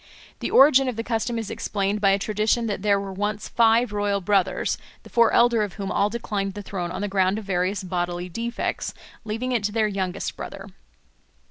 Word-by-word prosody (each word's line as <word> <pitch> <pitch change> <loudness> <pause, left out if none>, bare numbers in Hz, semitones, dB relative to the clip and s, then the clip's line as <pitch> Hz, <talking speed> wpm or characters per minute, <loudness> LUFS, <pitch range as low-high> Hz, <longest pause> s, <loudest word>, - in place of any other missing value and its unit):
The - - -3
origin 270 -1 +6
of 250 - -2
the 230 - -3
custom 230 0 -1
is 225 -2 -4
explained 200 0 -2
by 200 - +5
a 195 - +4
tradition 215 +3 0
that 205 -4 -2
there 200 -1 +3
were 195 -1 -5
once 205 +2 -2
five 230 0 +3
royal 205 -1 0
brothers, 190 -1 +1 0.2
the - - -15
four 235 -1 +4
elder 235 -2 +4
of 205 -3 -2
whom 200 -2 -4
all 205 - +2
declined 205 -4 -3
the 205 - -6
throne 180 -3 -4
on 185 +2 -5
the 205 - -1
ground 190 0 +1
of 220 - -6
various 190 +1 -1
bodily 175 -1 -2
defects, 230 +6 -3 0.3
leaving 225 +4 -3
it 235 -4 0
to 210 - 0
their 215 0 +2
youngest 190 -3 -3
brother. - - -7
205 Hz, 205 wpm, -24 LUFS, 195-225 Hz, 0.3 s, origin